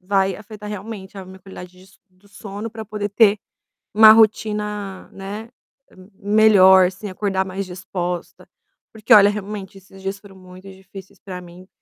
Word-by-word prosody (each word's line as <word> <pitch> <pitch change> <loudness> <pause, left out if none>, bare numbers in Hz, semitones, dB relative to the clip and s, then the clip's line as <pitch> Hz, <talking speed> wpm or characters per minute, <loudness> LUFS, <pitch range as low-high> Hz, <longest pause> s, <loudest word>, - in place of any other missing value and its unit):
Vai 195 0 0
afetar 210 0 -11
realmente 205 -1 -8
a 190 - -8
minha 190 +1 -13
qualidade 180 -1 -12
des 190 +1 -20
do 185 +2 -27
sono 205 +2 -8
pra 220 -1 -8
poder 205 -1 -5
ter 210 -1 +3 0.6
uma 215 0 +8
rotina, 210 -3 0
né, 205 +4 -8 0.7
melhor, 195 -3 +5
você 195 +3 -9
acordar 190 0 -2
mais 190 +1 -5
disposta. 180 -1 -6 0.4
Porque 220 0 +2
olha, 205 -1 +7
realmente 205 -1 -7
esses 190 0 -18
dias 195 +1 -4
foram 200 -2 -17
muito 185 +1 -14
difíceis 190 0 -14
pra 185 -2 -9
mim, 180 +1 -15
195 Hz, 150 wpm, -20 LUFS, 190-210 Hz, 0.7 s, uma